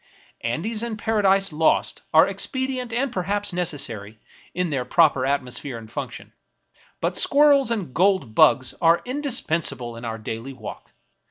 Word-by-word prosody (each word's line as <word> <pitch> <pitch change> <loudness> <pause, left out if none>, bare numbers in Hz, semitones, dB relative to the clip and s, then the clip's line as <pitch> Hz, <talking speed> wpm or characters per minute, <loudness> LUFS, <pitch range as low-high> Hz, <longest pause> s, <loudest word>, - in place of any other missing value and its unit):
Andes 195 - -2
and 235 -2 -4
Paradises 195 -4 +2
Lost 160 +1 +1
are - - +6
expedient 260 -2 -2
and 250 +2 -1
perhaps 200 +2 -1
necessary 120 - -2 0.3
in 180 -2 -2
their 135 -3 -1
proper 135 0 +3
atmosphere 135 -2 -2
and 110 -1 -12
function; - - -7 0.7
but - - -1
Squirrels 285 -3 +4
and 200 - -3
Gold 185 - +1
Bugs 130 +3 +4
are 165 +1 +4
indispensable 170 - -1
in 115 - -10
our 115 -1 -4
daily 115 +4 -6
walk. 120 -5 -10
170 Hz, 140 wpm, -23 LUFS, -, 0.7 s, are